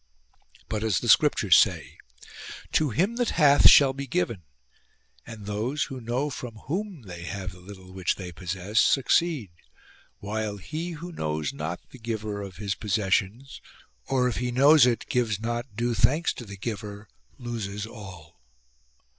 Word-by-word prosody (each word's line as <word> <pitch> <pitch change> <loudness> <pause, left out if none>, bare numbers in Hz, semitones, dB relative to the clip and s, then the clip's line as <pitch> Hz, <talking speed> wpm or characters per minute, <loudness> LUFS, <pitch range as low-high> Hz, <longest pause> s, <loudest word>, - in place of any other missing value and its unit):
But 110 0 -3
as 110 -5 +1
the - - -5
scriptures - - +5
say: - - +2 0.4
" - - -12 0.3
To 155 -2 +2
him 190 - 0
that 245 -2 +1
hath 145 -3 +7
shall 135 -2 +7
be 140 +1 -6
given"; 95 -3 -1 0.9
and 110 -3 -9
those, 110 +8 -1
who 130 -2 -7
know 125 +6 -2
from 125 -3 -7
whom 185 - -4
they 90 -4 -9
have 95 -1 -5
the 90 - -14
little 95 0 -12
which 95 -1 -1
they 90 -2 -7
possess, 95 +4 -2
succeed; 135 - +2 0.7
while 105 0 -4
he 160 - -5
who 170 +3 -8
knows 75 - -3
not 85 +3 -5
the 130 - -13
giver 110 -3 -4
of 95 -3 -8
his 100 -2 -2
possessions, 105 +4 -1 0.5
or, 130 -2 +2
if 125 - -2
he 125 +1 -1
knows 140 +2 +6
it, 120 -2 0
gives 115 -5 0
not 120 +1 -4
due 120 +2 0
thanks 150 - +2
to 120 - -9
the 100 -1 -9
Giver, 105 0 -6 0.3
loses 110 -5 -5
all. 95 - -12
110 Hz, 160 wpm, -26 LUFS, 100-135 Hz, 0.9 s, hath